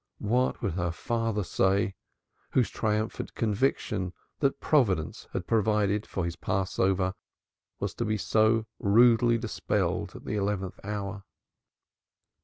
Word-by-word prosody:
What 125 +5 +1
would - - 0
her 85 -1 -1
father 115 +2 -1
say, 95 +3 +1 0.6
whose 125 -3 +2
triumphant 110 0 -2
conviction 105 -4 0 0.3
that 140 -1 +1
Providence 100 - +1
had 90 - -3
provided 105 -1 +1
for 95 - -2
his 85 -1 -3
Passover 95 0 0 0.7
was - - -2
to 120 - -2
be 110 0 0
so 110 +1 +3
rudely 115 +3 +5
dispelled 115 - -1
at - - -10
the - - -3
eleventh 100 -2 -2
hour. 100 -1 -4
105 Hz, 120 wpm, -28 LUFS, 95-115 Hz, 0.7 s, rudely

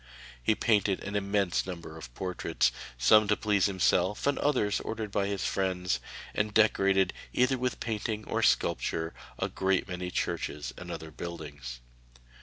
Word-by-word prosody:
He 110 - +2
painted 105 -4 +2
an 100 - -5
immense 100 -3 +1
number 85 -3 -7
of 75 -7 -9
portraits, 85 -8 0 0.3
some 105 - +6
to 105 - +3
please 105 -3 +2
himself 95 0 +2
and 140 0 +2
others 125 -8 +2
ordered 110 -2 -4
by 100 -1 +1
his 100 -2 -2
friends, 90 -2 0 0.3
and 105 0 0
decorated, 100 -3 +4 0.2
either 125 +2 +3
with 125 0 -1
painting 110 -1 -2
or - - -1
sculpture, 80 0 +1 0.2
a - - 0
great 95 -1 0
many 90 -1 -4
churches 75 -4 -2
and - - -9
other 80 0 -6
buildings. 70 -8 -7
95 Hz, 150 wpm, -30 LUFS, 85-105 Hz, 0.3 s, some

